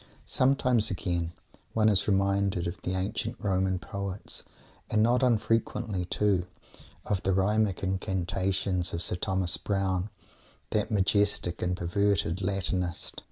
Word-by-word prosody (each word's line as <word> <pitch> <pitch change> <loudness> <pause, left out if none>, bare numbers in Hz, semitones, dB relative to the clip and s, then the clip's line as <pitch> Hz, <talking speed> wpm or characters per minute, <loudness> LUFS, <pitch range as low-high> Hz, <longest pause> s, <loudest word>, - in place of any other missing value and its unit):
Sometimes, 130 -4 +3
again, 85 -3 -2 0.4
one 110 -1 +3
is 100 -2 +3
reminded 100 -2 +2
of 85 +3 -4
the 90 - -2
ancient 105 +5 -2
Roman 95 -1 +1
poets, 100 +1 -5 0.5
and 110 0 +3
not 120 +3 +3
unfrequently, 115 -5 +1
too, 95 -1 +1 0.6
of 100 -3 0
the 95 - +1
rhythmic 100 +1 +1
incantations 95 0 -1
of 85 - 0
Sir - - -2
Thomas 95 0 0
Browne, 95 -1 -1 0.6
that 105 -1 +1
majestic 100 -3 +2
and 90 0 0
perverted 95 0 +1
Latinist. 95 -2 -1
95 Hz, 120 wpm, -29 LUFS, 90-105 Hz, 0.6 s, Sometimes